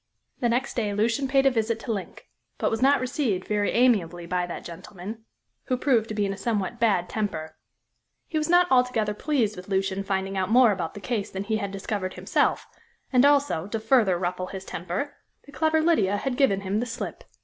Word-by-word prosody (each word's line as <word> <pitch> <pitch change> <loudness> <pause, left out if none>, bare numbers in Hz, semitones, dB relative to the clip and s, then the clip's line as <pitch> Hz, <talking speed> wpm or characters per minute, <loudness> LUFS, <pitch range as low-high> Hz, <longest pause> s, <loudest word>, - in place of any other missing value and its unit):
The 240 - +1
next 245 +3 0
day 210 -4 -1
Lucian 230 +6 +1
paid 270 0 +3
a 270 - +6
visit 225 -1 0
to 240 - -4
Link, 195 -3 -7 0.3
but - - 0
was 225 - -1
not 280 +2 +5
received 250 -7 -1
very 210 -1 +1
amiably 195 -9 +2
by 180 0 -1
that 175 - -7
gentleman, 190 +5 -9 0.4
who 255 - 0
proved 245 -5 +2
to 215 - -4
be 205 -1 +1
in 195 - -1
a - - -8
somewhat 215 +1 -2
bad 200 -7 +2
temper. 165 -7 -3 0.7
He 315 - -1
was 305 - -2
not 355 +1 +6
altogether 250 -5 +2
pleased 230 -3 0
with 180 0 -10
Lucian 195 0 -1
finding 195 0 -2
out 190 0 -1
more 240 0 +6
about 180 -5 -3
the 205 - -8
case 215 -2 -2
than 190 +1 -4
he 220 +1 -1
had 200 -2 -3
discovered 195 -1 -4
himself, - - +1 0.5
and 250 0 +6
also 280 - +2
to 225 +2 -3
further 220 -5 +3
ruffle 180 +1 -2
his 190 0 -7
temper 180 - -4 0.3
the 285 - -14
clever 315 +3 +2
Lydia 215 - +2
had 260 +4 -2
given 245 -8 +2
him 195 +2 -1
the 245 - -2
slip. 235 +1 -6
215 Hz, 205 wpm, -26 LUFS, 190-250 Hz, 0.7 s, a